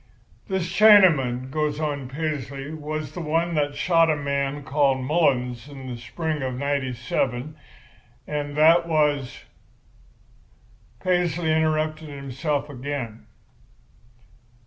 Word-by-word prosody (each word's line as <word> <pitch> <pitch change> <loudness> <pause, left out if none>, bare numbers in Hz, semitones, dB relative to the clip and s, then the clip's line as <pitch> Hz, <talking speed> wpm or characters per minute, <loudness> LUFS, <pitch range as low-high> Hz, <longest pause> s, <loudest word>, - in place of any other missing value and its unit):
"'This 190 -2 -1
Chinaman,' 155 - +5
goes 150 0 -1
on 145 -4 -3
Paisley, 140 -1 -4
'was 155 -1 -5
the 175 - -6
one 165 +2 0
that 145 -2 0
shot 165 -2 +3
a 155 - +3
man 140 0 -2
named 135 -2 +1
Mullins 130 -5 +1
in 135 -2 -10
the 125 -1 -5
spring 155 +6 -4
of 130 -1 -2
'97, 130 0 -2 0.7
and 145 -1 -4
that 165 +2 +5
was—' 150 -5 0 1.6
"Paisley 175 -3 +1
interrupted 155 0 0
himself 140 +1 -3
again. 130 -5 -6
145 Hz, 105 wpm, -24 LUFS, 135-155 Hz, 1.6 s, Chinaman